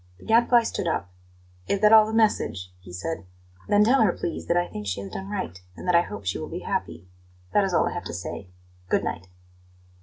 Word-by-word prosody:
The - - -16
Gadfly 235 +1 +5
stood 190 - -3
up. 90 - -2 0.6
"Is 200 - +1
that 210 +1 +6
all 215 -1 +8
the - - -4
message?" 210 - +1
he 90 -1 -13
said. 100 - -4 0.4
"Then 205 0 +5
tell 250 +4 +4
her, 210 -5 +5
please, 170 - -5
that 170 - +2
I 175 0 +1
think 105 -1 -7
she 95 0 -2
has 100 -1 -8
done 195 +1 -6
right, 185 - -4 0.2
and - - -8
that 180 - +3
I 170 - +6
hope 100 - -7
she 95 - -1
will - - -6
be - - -5
happy. 85 +2 -4 0.5
That 205 - +4
is 195 - 0
all - - +3
I - - -3
have 175 - -5
to - - -5
say. 90 +2 -6 0.4
Good - - +2
night!" 90 +3 -4
175 Hz, 235 wpm, -25 LUFS, -, 0.6 s, all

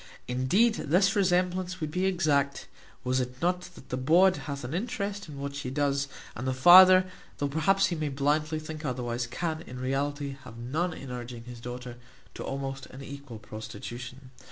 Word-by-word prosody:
Indeed 130 - +3 0.2
this 190 +5 +4
resemblance 180 -1 +1
would 155 -2 -3
be 185 +3 +1
exact, 145 -6 +1 0.4
was 130 0 +1
it 125 0 -4
not 180 +2 0
that - - -14
the 125 - -2
bawd 175 +8 +5
hath 140 -5 -5
an 125 +4 -5
interest 200 -1 -3
in 145 - -8
what 140 0 -4
she 140 -3 -4
doth, 140 0 0 0.3
and 125 +3 -4
the 130 - 0
father, 185 +6 +9 0.3
though 145 - 0
perhaps 160 +7 +3
he 175 - -1
may 155 -2 -2
blindly 150 +3 +1
think 155 0 -7
otherwise, 120 -3 -2
can, 160 +5 -3
in 125 -6 -9
reality, 140 +2 -2
have 115 -3 -11
none 150 +10 -1
in 135 -2 -8
urging 120 -1 -6
his 120 0 -9
daughter 125 0 -7 0.4
to - - -6
almost 135 0 -4
an 135 +2 -10
equal 140 -4 -8
prostitution. 120 +4 -8
140 Hz, 180 wpm, -28 LUFS, 130-175 Hz, 0.4 s, father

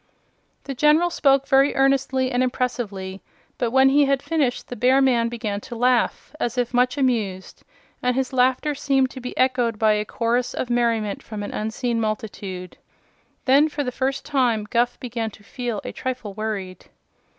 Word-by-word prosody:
The 275 - -5
General 300 +6 +3
spoke 275 -3 +3
very 270 +1 +4
earnestly 270 -1 +2
and 245 0 +1
impressively, 220 -7 -2 0.4
but 240 - +1
when 265 +2 +5
he 285 +1 +4
had 275 -1 +1
finished 290 -7 -1
the 245 - -6
bear 255 +4 +4
man 240 -4 +3
began 220 -4 -4
to 240 - -8
laugh 245 +3 +1
as 240 -2 -2
if 245 0 -1
much 250 +3 +2
amused, 220 -9 -1 0.4
and 250 0 +1
his 265 0 -1
laughter 260 +4 +2
seemed 270 -2 +1
to 260 - -9
be 250 - -7
echoed 250 -3 +1
by 215 0 +3
a 210 0 0
chorus 240 +3 -1
of 245 - -3
merriment 230 -4 0
from 210 -2 -7
an 205 - -6
unseen 230 +2 -2
multitude. 200 -4 -5 0.7
Then, 280 +4 +5
for 295 -1 -3
the 250 - -3
first 270 +2 -2
time, 245 -7 +1
Guph 240 +3 0
began 235 -2 -3
to 205 - -17
feel 240 -1 -4
a - - -5
trifle 250 -6 -5
worried. 200 -3 -5
245 Hz, 175 wpm, -23 LUFS, 220-265 Hz, 0.7 s, when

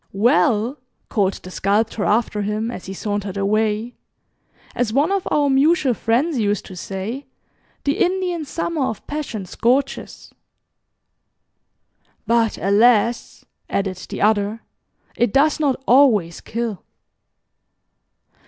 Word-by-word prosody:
"Well," 240 +3 +2 0.3
called 195 -3 +1
the 185 - -11
Sculptor 205 +3 0
after 210 -1 +1
him, 215 +3 -2
as 185 - -8
he 190 - -5
sauntered 205 -1 -3
away, 215 +3 0 0.8
"as 245 -3 -1
one 285 - +2
of 395 -2 -1
our 290 -1 +2
mutual 280 +1 +3
friends 250 +7 0
used 205 -1 0
to 190 - -10
say 195 +9 -5 0.6
'The 285 +1 0
Indian 360 -2 -1
Summer 320 0 -2
of 220 - -5
Passion 275 -10 -4
scorches.'" 255 +9 -1 1.9
"But, 230 0 +2
alas!" 225 +3 +2 0.2
added 195 -2 -1
the - - -3
other, 210 +1 +1 0.5
"it 240 -3 +1
does 295 +5 +3
not 285 -4 +1
always 225 -10 +4
kill." 225 -5 -4
230 Hz, 115 wpm, -21 LUFS, 205-275 Hz, 1.9 s, always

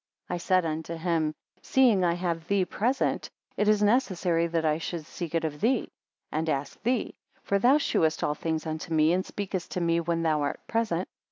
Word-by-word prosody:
41 180 - -1
I - - -2
said 185 0 +2
unto 160 +1 -3
him; 165 -2 0 0.3
seeing 240 -8 +4
I 170 -1 +3
have 170 -2 -3
thee 200 -2 +2
present, 245 +9 0 0.3
it 210 - +1
is 210 -1 +4
necessary 185 -7 +2
that 165 -1 -1
I 155 0 +2
should 165 -1 -4
seek 170 0 -6
it 165 - +1
of 150 -2 -4
thee, 240 +3 +1 0.4
and 160 +1 -1
ask 140 -1 -3
thee; 245 -1 0 0.3
for 200 - +1
thou 255 +7 +5
shewest 160 - +1
all 150 - +1
things 160 +1 -3
unto 160 +1 -3
me, 155 +2 +4
and 185 +1 +1
speakest 190 -3 -4
to - - -1
me 170 -1 +2
when 165 0 -1
thou 155 -2 +2
art 145 - -2
present. 205 -6 -1
170 Hz, 200 wpm, -27 LUFS, 160-200 Hz, 0.4 s, thou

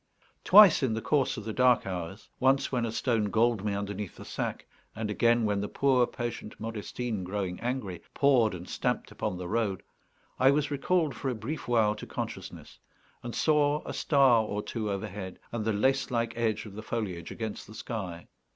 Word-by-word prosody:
Twice 200 -4 +8
in 125 -5 +1
the - - -1
course 135 -3 +1
of 110 - -5
the 110 +1 -4
dark 125 0 +4
hours 90 0 -5
once 135 +1 +3
when 120 -3 0
a - - -3
stone 115 -2 +1
galled 110 0 +2
me 105 -1 -1
underneath 100 -1 -4
the - - -11
sack, - - -4 0.3
and 110 -1 -3
again 115 +2 +3
when 105 -1 0
the 105 - -2
poor 130 -1 +3
patient 120 -3 -6
Modestine, 110 -1 -4
growing 95 -1 -3
angry, 120 -8 -3
pawed 125 -8 +4
and 90 +1 -9
stamped - - -2
upon 90 - -3
the 90 -1 -5
road 100 -1 -1 0.6
I 130 - +6
was 145 +1 +1
recalled 155 +2 +1
for 135 - -3
a 125 - -2
brief 120 +9 -5
while 110 -3 +3
to 105 - -9
consciousness, - - -7 0.4
and 120 -1 -6
saw 150 -1 +2
a - - -5
star 135 -6 +4
or 105 -1 -3
two 110 -3 -3
overhead, 100 -1 -5
and 115 -2 -2
the 110 - +1
lace 130 +6 +1
like 115 -2 -1
edge 115 -2 -1
of 105 - -10
the 110 - -7
foliage 100 -7 -4
against 110 -2 -5
the 110 - -12
sky. 95 -8 -5
115 Hz, 190 wpm, -29 LUFS, 105-130 Hz, 0.6 s, Twice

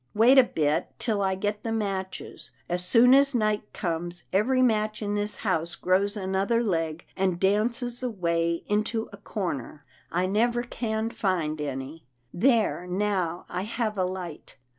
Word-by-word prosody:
Wait 235 +5 +6
a - - +8
bit, 155 -7 0
till 220 -3 0
I 190 -1 +1
get 205 +2 -2
the 225 - -3
matches. 195 -4 -4 0.2
As 175 +1 -1
soon 240 +7 +6
as 275 0 +5
night 215 -2 0
comes, 175 0 -3
every 255 +7 +3
match 215 -2 +1
in 205 0 -1
this 205 0 -1
house 170 -3 0
grows 200 +3 +1
another 195 +4 0
leg, 165 -5 -1
and 185 -2 0
dances 235 +5 +1
away 170 -8 -1
into 215 +2 -1
a - - -9
corner. 175 - -5 0.3
I 180 +2 +1
never 235 +5 +1
can 225 -2 -2
find 165 -8 -1
any. 140 +2 -5 0.3
There 220 -4 +2
now, 185 -2 -1
I 180 - -3
have 215 +1 -2
a 190 - +1
light. 180 -6 -6
200 Hz, 155 wpm, -27 LUFS, 175-225 Hz, 0.3 s, a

